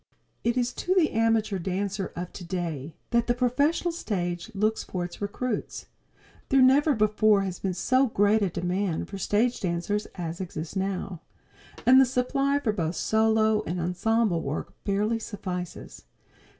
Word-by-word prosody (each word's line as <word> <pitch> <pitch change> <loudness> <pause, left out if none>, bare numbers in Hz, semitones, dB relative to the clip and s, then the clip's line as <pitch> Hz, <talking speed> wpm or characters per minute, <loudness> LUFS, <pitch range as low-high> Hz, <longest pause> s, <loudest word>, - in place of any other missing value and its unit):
It 235 +1 +1
is 245 0 0
to 370 - +1
the 340 -5 +3
amateur 225 -3 +1
dancer 195 +2 -2
of 175 0 -5
today 170 -5 -4 0.2
that 235 -1 +2
the 240 - +2
professional 285 +8 +1
stage 175 - -3
looks 215 +2 +1
for 180 -2 -3
its 175 - -10
recruits. 225 +5 -3 0.6
There 270 - +4
never 285 +3 +5
before 215 -1 +3
has 185 -2 -4
been 190 -2 -2
so 260 +8 +3
great 210 0 +3
a 195 - +2
demand 180 0 -2
for 195 - -6
stage 225 +6 +1
dancers 180 +4 -1
as 170 0 -5
exists 165 -2 -6
now, 190 -2 -3 0.6
and 260 +2 +8
the - - +6
supply 275 +3 +1
for 240 -7 0
both 170 -3 -2
solo 220 -1 +2
and 180 +1 -2
ensemble 180 +2 +1
work 140 +1 -4
barely 210 +3 +1
suffices. 185 -5 -6
205 Hz, 150 wpm, -27 LUFS, 180-235 Hz, 0.6 s, and